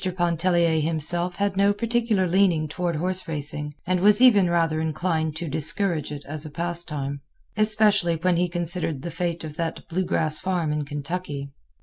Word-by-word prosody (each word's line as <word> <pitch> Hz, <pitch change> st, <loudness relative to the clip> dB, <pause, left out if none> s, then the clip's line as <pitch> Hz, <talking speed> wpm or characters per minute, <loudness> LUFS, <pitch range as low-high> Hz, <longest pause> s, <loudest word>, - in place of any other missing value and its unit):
Pontellier 170 Hz, -1 st, +2 dB
himself 165 Hz, +3 st, -1 dB
had 200 Hz, -1 st, -1 dB
no 200 Hz, +1 st, +3 dB
particular 230 Hz, -3 st, 0 dB
leaning 175 Hz, -4 st, +2 dB
toward 175 Hz, +2 st, -2 dB
horseracing, 150 Hz, -4 st, -2 dB
and 185 Hz, 0 st, +1 dB
was 205 Hz, +4 st, +6 dB
even 210 Hz, -8 st, +6 dB
rather 165 Hz, -2 st, +1 dB
inclined 160 Hz, 0 st, -1 dB
to 165 Hz, +1 st, -5 dB
discourage 155 Hz, +1 st, -2 dB
it 145 Hz, -1 st, -7 dB
as 150 Hz, +1 st, -5 dB
a 155 Hz, -, -7 dB
pastime, 150 Hz, -4 st, -1 dB, 0.3 s
especially 210 Hz, -4 st, +3 dB
when 175 Hz, +2 st, +1 dB
he 175 Hz, +1 st, +1 dB
considered 170 Hz, -4 st, -1 dB
the 170 Hz, -, -4 dB
fate 170 Hz, 0 st, -3 dB
of 155 Hz, -1 st, -8 dB
that 165 Hz, -1 st, -4 dB
blue 180 Hz, +2 st, -1 dB
grass 155 Hz, -3 st, +1 dB
farm 175 Hz, -5 st, -1 dB
in 150 Hz, -1 st, -2 dB
Kentucky. 145 Hz, -1 st, -5 dB
170 Hz, 160 wpm, -24 LUFS, 155-185 Hz, 0.3 s, was